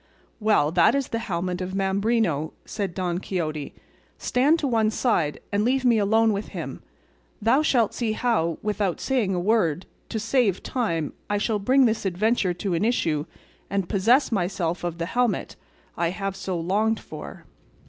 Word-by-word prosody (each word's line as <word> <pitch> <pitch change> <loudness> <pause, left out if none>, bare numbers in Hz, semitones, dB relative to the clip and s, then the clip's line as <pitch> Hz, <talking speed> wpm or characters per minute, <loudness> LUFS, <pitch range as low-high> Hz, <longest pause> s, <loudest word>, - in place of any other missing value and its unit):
"Well, 210 -9 +3
that 175 +7 +4
is 275 -2 -1
the 230 - -2
helmet 180 -4 -3
of 185 +1 -4
Mambrino," 195 -5 0
said 200 -5 -4
Don 180 -2 -1
Quixote; 155 -6 -4 0.4
"stand 280 +6 +2
to 295 - -1
one 225 -3 +2
side 215 - 0
and 205 +1 +1
leave 260 +3 +1
me 235 -3 +4
alone 220 +2 +3
with 200 +1 -3
him; - - -6 0.6
thou 235 +6 +3
shalt 245 -8 +2
see 225 -3 -1
how, 215 -9 0
without 205 -4 -1
saying 230 -8 0
a - - 0
word, 185 -4 +1 0.2
to - - -3
save 220 -3 +1
time, 165 - -1 0.2
I 205 - +1
shall 210 +1 0
bring 260 +6 +4
this 220 -1 +1
adventure 190 0 +1
to 190 +1 -2
an 170 +3 0
issue 165 -10 0 0.4
and 195 -2 -1
possess 235 +10 +3
myself 175 -4 -1
of 170 -1 -3
the 170 - -2
helmet 245 +5 0 0.4
I 170 - 0
have 195 +1 -3
so 190 -2 -3
longed 210 +6 +1
for." - - -10
200 Hz, 170 wpm, -25 LUFS, 175-230 Hz, 0.6 s, that